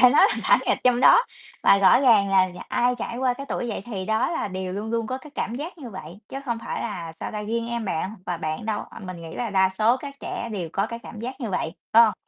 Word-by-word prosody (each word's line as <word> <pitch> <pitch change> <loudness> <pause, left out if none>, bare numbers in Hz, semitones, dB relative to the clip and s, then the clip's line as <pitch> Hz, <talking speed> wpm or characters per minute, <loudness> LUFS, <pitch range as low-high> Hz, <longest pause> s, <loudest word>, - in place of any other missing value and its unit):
phải 250 0 +8
nói 340 +9 +7
là - - 0
phản - - +5
nghịch - - +2
trong 250 -1 +4
đó. 470 - +8 0.4
Và 200 - +6
rõ 195 +5 +6
ràng 220 -7 +5
là 190 -1 +5
nhà 180 - -9
ai 245 +1 +2
trải 235 - -4
qua 250 -1 +1
cái 275 +2 -8
tuổi 240 - -2
dậy 205 - -4
thì 200 -6 -4
đó 220 +3 +1
là 325 -11 -2
đều 185 0 -4
luôn 210 +3 -4
luôn 230 -1 -1
có 255 +2 -3
cái 300 - -13
cảm 230 - -2
giác 320 +6 -6
như 250 -6 -8
vậy, 185 -1 -9
chứ 270 - -5
không 235 -4 -2
phải - - -4
là, 170 -7 -5
sao 165 - -6
ta, 210 0 -4
riêng 230 +2 -2
em 235 -1 -2
bạn 185 +3 -2
và 175 - -1
bạn 155 +3 -4
đâu, 215 -2 -1
à, - - -10
mình 185 -4 -8
nghĩ 165 - -8
là 240 -3 -2
đa 190 -1 +4
số 230 +4 +4
các 280 +1 -8
trẻ 235 - -4
đều 180 -6 -3
có 195 +3 +1
cái 230 +1 -6
cảm 220 -2 -10
giác 260 +3 -6
như 230 - -3
vậy, 165 -3 -1 0.2
phải 230 - +9
hông? 215 - +1
220 Hz, 290 wpm, -24 LUFS, 190-245 Hz, 0.4 s, phải